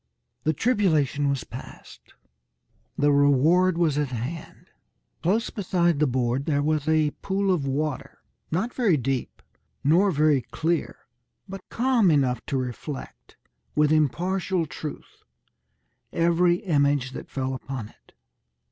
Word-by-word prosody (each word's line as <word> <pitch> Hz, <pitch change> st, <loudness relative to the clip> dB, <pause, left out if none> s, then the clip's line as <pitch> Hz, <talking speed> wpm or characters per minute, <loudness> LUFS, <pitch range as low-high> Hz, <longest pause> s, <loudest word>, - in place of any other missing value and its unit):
The 155 Hz, -, +2 dB
tribulation 155 Hz, -, +1 dB
was 140 Hz, -3 st, -1 dB
passed. -, -, -12 dB, 0.8 s
The 145 Hz, 0 st, +3 dB
reward 150 Hz, +6 st, +4 dB
was 155 Hz, -4 st, +2 dB
at 145 Hz, -, 0 dB
hand. 130 Hz, +6 st, -6 dB, 0.6 s
Close 215 Hz, +7 st, +1 dB
beside 175 Hz, -, +1 dB
the 150 Hz, -, +3 dB
board 125 Hz, +1 st, -1 dB
there 145 Hz, -2 st, +1 dB
was 155 Hz, -1 st, 0 dB
a 155 Hz, -1 st, +3 dB
pool 195 Hz, 0 st, +1 dB
of 145 Hz, -6 st, -1 dB
water, 145 Hz, 0 st, -3 dB, 0.3 s
not 195 Hz, +9 st, -1 dB
very 210 Hz, -, +2 dB
deep, 130 Hz, 0 st, -3 dB, 0.4 s
nor 175 Hz, +8 st, +4 dB
very 150 Hz, -4 st, +3 dB
clear, 160 Hz, +8 st, -2 dB, 0.5 s
but 195 Hz, 0 st, -9 dB
calm 240 Hz, -5 st, +2 dB
enough 130 Hz, -6 st, +2 dB
to 135 Hz, -, -1 dB
reflect, 130 Hz, +3 st, -6 dB, 0.4 s
with 150 Hz, 0 st, +3 dB
impartial 175 Hz, +4 st, +1 dB
truth, 150 Hz, +1 st, -8 dB, 0.9 s
every 170 Hz, +1 st, +3 dB
image 145 Hz, -7 st, +1 dB
that -, -, -8 dB
fell 130 Hz, -1 st, -3 dB
upon 130 Hz, -4 st, -6 dB
it. -, -, -26 dB
155 Hz, 125 wpm, -25 LUFS, 140-175 Hz, 0.9 s, reward